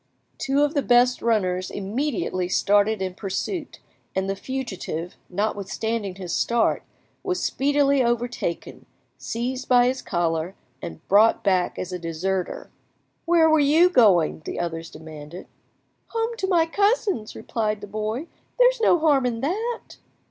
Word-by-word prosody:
Two 275 +2 +2
of 295 +1 +1
the 285 - +1
best 245 0 +3
runners 185 -5 0
immediately 200 - -2
started 205 +1 +2
in 185 -1 -3
pursuit, 225 - -4 0.4
and 190 0 0
the 195 - -1
fugitive, 190 -9 -5
notwithstanding 205 +1 -2
his 185 -3 -6
start, 235 -1 +1 0.4
was 370 -2 -2
speedily 280 -1 +2
overtaken, 240 -7 -3 0.3
seized 250 +3 -4
by 245 -1 +6
his 255 +1 0
collar, 170 +1 -1 0.3
and 80 -1 -9
brought 215 +3 +4
back 185 -3 +1
as 185 0 -5
a 180 - -3
deserter. 175 +3 -3 0.5
"Where 335 -1 +5
were 315 -1 +4
you 315 +5 +5
going?" 190 - +4
the - - -5
others 165 -1 -4
demanded. 155 +2 -10 0.6
"Home 460 0 -2
to 380 - -1
my 345 -4 +3
cousins," 400 - 0
replied 215 -2 -2
the 205 - -8
boy; 215 +7 -3 0.3
"there - - +7
is - - -9
no 355 - +5
harm 290 -5 +3
in 230 -2 -3
that." 440 - -3
225 Hz, 140 wpm, -24 LUFS, 185-285 Hz, 0.6 s, there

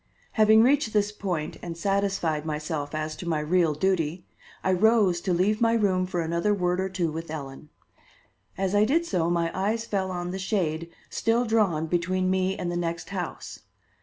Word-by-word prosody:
Having 220 0 +5
reached 265 -3 +2
this 210 -1 +2
point 180 -7 -3
and 170 -1 -6
satisfied 195 -5 0
myself 150 -1 -3
as 155 0 -3
to 175 - -5
my 160 -2 +1
real 160 0 +2
duty, 175 0 0 0.4
I 190 - +2
rose 195 -2 +3
to 185 - -1
leave 200 +6 +1
my 230 0 +4
room 190 -5 +2
for 175 -2 -2
another 170 +5 0
word 180 -1 0
or 190 0 -1
two 180 -4 -1
with 165 +1 -6
Ellen. 145 -1 -7 0.9
As 190 0 -1
I 205 0 +5
did 320 +9 +2
so 170 - 0
my 170 -1 0
eyes 215 +4 -1
fell 195 -4 -1
on 175 -1 -4
the 190 - -4
shade 170 -5 -1 0.2
still 235 +2 +1
drawn 205 -9 +2
between 185 +2 0
me 190 0 0
and 175 - -3
the 175 - -2
next 170 -1 -3
house. 180 -3 -5
180 Hz, 185 wpm, -26 LUFS, 165-205 Hz, 0.9 s, Having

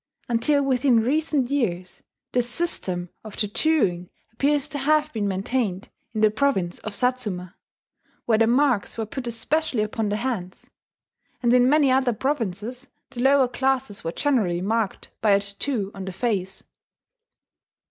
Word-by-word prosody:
Until 275 +5 +2
within 255 -3 +3
recent 280 0 +1
years 185 -10 -2 0.3
this 245 -1 +1
system 185 - -1
of 215 -2 -10
tattooing 205 - +1 0.2
appears 285 +4 +1
to 290 - -4
have 305 +2 +2
been 210 -3 -1
maintained 195 0 -2 0.3
in 215 - 0
the 215 -1 +5
province 215 -8 0
of 215 -1 -6
Satsuma, 210 -8 -1 0.7
where 220 -2 +3
the 225 - +4
marks 250 -5 +2
were 225 - -1
put 245 +3 -6
especially 235 +1 0
upon 215 0 -2
the 205 - 0
hands; 215 -7 -4 0.7
and 240 0 +4
in 250 0 +5
many 290 -2 +4
other 260 -2 +3
provinces 245 0 -3 0.2
the 240 - -5
lower 270 0 +5
classes 260 -3 -1
were 165 - -2
generally 210 - +1
marked 210 +2 -2
by 210 -2 +4
a 200 - +5
tattoo 200 +1 -2
on 195 -1 -7
the 190 - -4
face. 190 -3 -2
235 Hz, 145 wpm, -24 LUFS, 200-270 Hz, 0.7 s, the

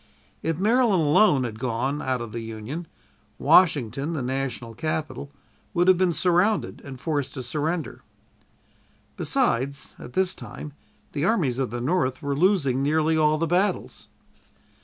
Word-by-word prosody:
If 165 -1 -1
Maryland 215 -2 +3
alone 150 -2 +4
had 110 -3 -5
gone 130 +4 -1
out 130 -2 -1
of 115 -2 -6
the 115 - -4
Union, 115 +9 -6 0.5
Washington, 145 - +3
the 145 -5 -2
national 125 -3 -3
capital, 155 +1 -4 0.4
would 175 +1 +3
have 185 -1 +6
been 185 -2 +3
surrounded 180 +5 +1
and 135 -2 -9
forced 145 -3 -2
to 130 - -5
surrender. 155 +6 -3 1.1
Besides, 140 +4 -1
at 120 - -10
this 190 -1 +1
time, 150 - -9 0.4
the 145 - -2
armies 155 - +1
of 130 - 0
the 120 +2 -4
North 130 -2 0
were 140 0 -1
losing 145 -6 +2
nearly 155 +3 +2
all 155 -1 +3
the 165 - 0
battles. 180 +5 -1
145 Hz, 145 wpm, -25 LUFS, 130-175 Hz, 1.1 s, have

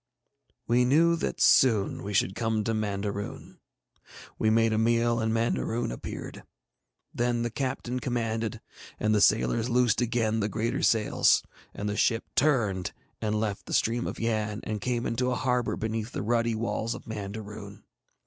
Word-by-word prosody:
We 120 +2 +3
knew 165 +7 +4
that - - -3
soon 110 -7 +4
we 100 - -5
should 95 0 +2
come 110 0 -1
to 115 - -1
Mandaroon. 100 -1 -4 0.8
We 110 - +3
made 115 0 +3
a 110 - +1
meal, 115 +1 +2
and 110 -1 0
Mandaroon 115 - 0
appeared. - - -7 0.7
Then 120 0 0
the 120 - -2
captain 130 -1 -3
commanded, 115 -2 -2 0.4
and 110 0 +2
the 105 - +3
sailors 115 +3 +3
loosed 125 -1 +3
again 115 -2 0
the 105 0 0
greater 110 +4 -1
sails, 110 -2 +3 0.3
and 105 - -3
the 105 - -2
ship 115 +1 +2
turned 110 -11 +1 0.3
and 105 -1 0
left 105 -2 -3
the - - -1
stream 120 +2 +1
of - - -5
Yann 110 -2 -1
and 105 -1 -4
came 120 0 -1
into 125 +2 0
a 125 - 0
harbour 125 -2 0
beneath 110 +1 -3
the - - -3
ruddy 115 +1 +1
walls 115 0 -2
of - - -10
Mandaroon. 105 -1 -7
115 Hz, 160 wpm, -28 LUFS, 105-120 Hz, 0.8 s, knew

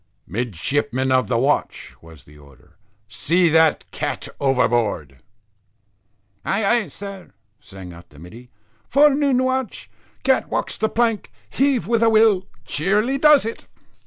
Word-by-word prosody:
"Midshipman 125 - -2
of 130 0 +2
the 120 - 0
watch," 140 +5 -1
was 80 -3 -16
the 75 - -19
order, 70 -3 -20 0.3
"see 170 - +1
that 160 0 +3
cat - - -4
overboard." 120 - 0 1.3
"Ay 200 +2 -1
ay, 230 0 +1
sir," 200 -2 -9 0.3
sang 95 -3 -12
out 85 0 -15
the 75 - -19
middy. 110 +10 -13 0.4
"Forenoon 280 -2 +3
watch, 260 -2 -3 0.3
cat - - +1
walks - - -2
the 220 - -1
plank, 225 - -1 0.2
heave 270 - +1
with 230 +2 0
a 230 - +4
will 215 -4 +3 0.2
cheerily 210 - 0
does 300 -4 +5
it." 225 - -7
160 Hz, 130 wpm, -20 LUFS, -, 1.3 s, does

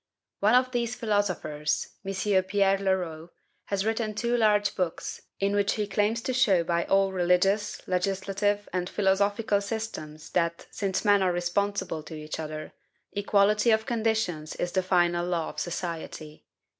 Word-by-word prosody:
One 215 +4 +4
of 255 0 +3
these 240 -1 -1
philosophers, 190 -9 -1
M. 195 0 +1
Pierre 195 0 +2
Leroux, 175 -4 -1 0.4
has 200 0 -1
written 220 -1 -1
two 235 +2 0
large 210 -3 +3
books, 180 -3 -3 0.2
in 200 +1 +1
which 205 0 +2
he 210 - -1
claims 210 +3 0
to 255 - -1
show 210 -9 +4
by 170 0 0
all 195 0 +3
religious, 190 +3 +1
legislative, 195 +2 0
and 180 0 -1
philosophical 200 +1 +1
systems 200 -8 -6
that, 170 -1 0
since 195 0 -2
men 205 -1 +5
are 185 -1 +3
responsible 175 -1 -1
to 155 +1 -9
each 155 +1 -6
other, 155 -1 -6 0.4
equality 205 +2 +3
of 220 0 +3
conditions 220 -9 -1
is 175 - -2
the 190 - +1
final 175 -2 +2
law 175 -2 -1
of - - -7
society. 165 -3 -5
195 Hz, 150 wpm, -27 LUFS, 175-210 Hz, 0.4 s, men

